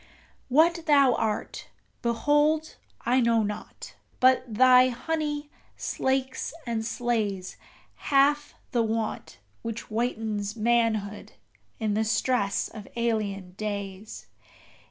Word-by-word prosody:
What 330 +5 +3
thou 280 -4 +5
art, 220 -2 -2 0.3
behold, 295 +6 +1 0.3
I 250 +2 +3
know 230 -2 +3
not; 210 0 -6 0.3
but 255 0 +5
thy 255 +3 +6
honey 295 +3 -3 0.3
slakes 265 +2 -2
and 230 -2 -2
slays 220 -5 -2 0.5
Half 290 +1 +3 0.2
the 240 - +2
want 225 0 -3 0.2
which 230 0 -4
whitens 215 -2 -2
manhood 220 -2 0 0.5
in 215 -2 0
the 215 +2 +1
stress 220 -1 0
of 210 -3 -10
alien 210 -5 -1
days! 200 0 -6
235 Hz, 100 wpm, -27 LUFS, 215-265 Hz, 0.5 s, thy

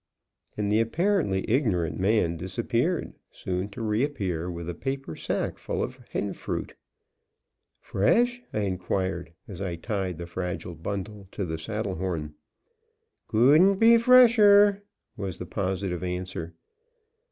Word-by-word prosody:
And 105 -1 -1
the 105 - +4
apparently 150 - +1
ignorant 105 - +1
man 95 -3 +2
disappeared, 115 - -1 0.2
soon 90 +2 -4
to 115 +3 -7
re 110 +2 +1
appear 95 - -2
with 85 -1 -6
a 85 - -3
paper 135 -5 -4
sack - - -3
full - - -2
of 130 - -5
hen 100 - -2
fruit. - - -5 1.1
"Fresh?" 240 - +2
I 105 - -1
inquired, 95 -2 -2 0.2
as 100 -3 -8
I 90 -3 -2
tied 95 -1 -3
the 85 - -6
fragile 90 +1 -4
bundle 100 +4 -6
to 100 - -3
the 80 -1 -4
saddle 105 -3 -3
horn. 80 -5 -3 0.9
"Couldn't 150 - +5
be 230 +4 +6
fresher," 210 -5 +6 0.4
was 95 -3 -4
the 90 - -6
positive 95 -1 -2
answer. 90 -2 -4
100 Hz, 130 wpm, -26 LUFS, 90-130 Hz, 1.1 s, be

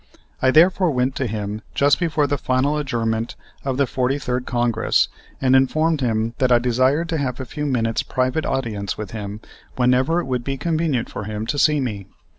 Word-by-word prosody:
I 130 - +4
therefore 175 +5 +5
went 130 -2 0
to 130 - -1
him 105 0 -4
just 140 0 +3
before 160 -4 +1
the 145 -1 -1
final 130 +3 +1
adjournment 115 -5 -2 0.3
of 135 -2 -2
the 140 - +3
43rd 125 0 -1
Congress 120 -2 +1 0.3
and 130 -1 +3
informed 155 +4 +2
him 115 -2 0
that 130 -2 +2
I 120 - +7
desired 130 +6 +1
to 165 -3 -1
have 130 -2 -2
a 130 - -4
few 150 +3 -4
minutes' 115 -4 0
private 130 +4 -1
audience 105 -7 -2
with 105 -3 -6
him 105 -1 -6 0.3
whenever 130 +6 +2
it - - -3
would 125 -2 -2
be 135 +1 -3
convenient 155 -4 0
for 105 - -6
him 105 +1 -4
to 145 +5 -2
see 150 -1 +4
me. 105 -7 -4
130 Hz, 190 wpm, -21 LUFS, 115-145 Hz, 0.3 s, I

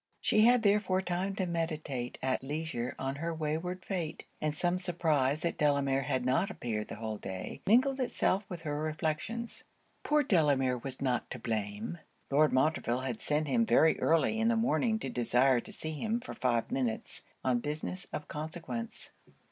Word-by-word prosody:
She 215 +1 +4
had 245 -1 +5
therefore 200 -2 +3
time 185 +2 -1
to 190 - 0
meditate 155 -7 -3
at 130 0 +1
leisure 145 -3 -3
on 135 +1 -3
her 165 +3 -2
wayward 160 +4 -3
fate: 175 -6 -3 0.2
and 155 -1 -1
some 175 +1 +1
surprise 155 -6 +1
that 170 - -2
Delamere 140 -2 +2
had 130 -2 -1
not 130 +10 +2
appeared 110 - -3
the - - -6
whole 110 -1 -4
day, 95 -1 -6
mingled 260 +6 +4
itself 215 -5 +1
with 175 -3 -6
her 150 -2 -2
reflections. 155 +9 -3 0.4
Poor 300 0 +3
Delamere 140 - +3
was 130 +2 -4
not 125 -2 0
to - - -5
blame. 110 +5 -3 0.3
Lord 150 +2 +5
Montreville 130 -3 +1
had 125 -4 -4
sent 150 +1 +1
him 230 +7 +3
very 160 -7 +4
early 165 +7 +3
in 225 - +2
the 230 - +3
morning 225 -1 +2
to - - -4
desire 125 +2 +3
to - - -8
see 160 - -4
him 220 +9 -1
for 250 - -8
five 120 -3 0
minutes 125 -4 -2 0.2
on 125 -2 +2
business 155 +7 -4
of 150 - -5
consequence. 170 +9 -5
155 Hz, 170 wpm, -31 LUFS, 130-185 Hz, 0.4 s, had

